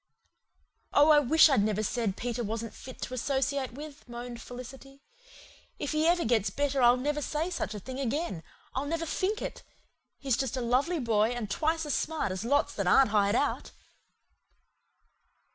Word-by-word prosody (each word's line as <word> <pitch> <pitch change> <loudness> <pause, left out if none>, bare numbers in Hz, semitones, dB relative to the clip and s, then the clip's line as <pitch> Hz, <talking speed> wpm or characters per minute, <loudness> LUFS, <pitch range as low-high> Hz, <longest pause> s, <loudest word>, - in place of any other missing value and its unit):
"Oh, 295 +2 +6
I 300 - +7
wish 310 +4 +6
I'd 270 -8 +3
never 215 0 0
said 220 -3 -1
Peter 240 0 -3
wasn't 225 +1 -4
fit 260 - -9
to - - -5
associate 265 0 -1
with," 290 -1 -10
moaned 240 0 -7
Felicity. 270 +3 -11 0.7
"If 290 - -3
he 310 +1 +2
ever 345 0 +3
gets 220 -3 +2
better 280 +4 0
I'll 240 0 +6
never 295 +3 -1
say 315 +5 -2
such 215 -11 -3
a - - -5
thing 260 +6 -7
again 275 - -2 0.3
I'll 270 +2 -2
never 330 +2 -2
THINK 390 +7 -1
it. - - -6 0.5
He's 270 -4 0
just 265 -1 -2
a - - -1
lovely 260 +9 +1
boy 220 -3 +2
and 225 -5 -5
twice 320 +6 0
as 295 - -2
smart 315 -11 -1
as 185 +2 -4
lots 285 +5 +1
that 200 -3 -2
aren't 240 +4 +5
hired 205 0 +3
out." 290 - -1
260 Hz, 175 wpm, -29 LUFS, 230-295 Hz, 0.7 s, I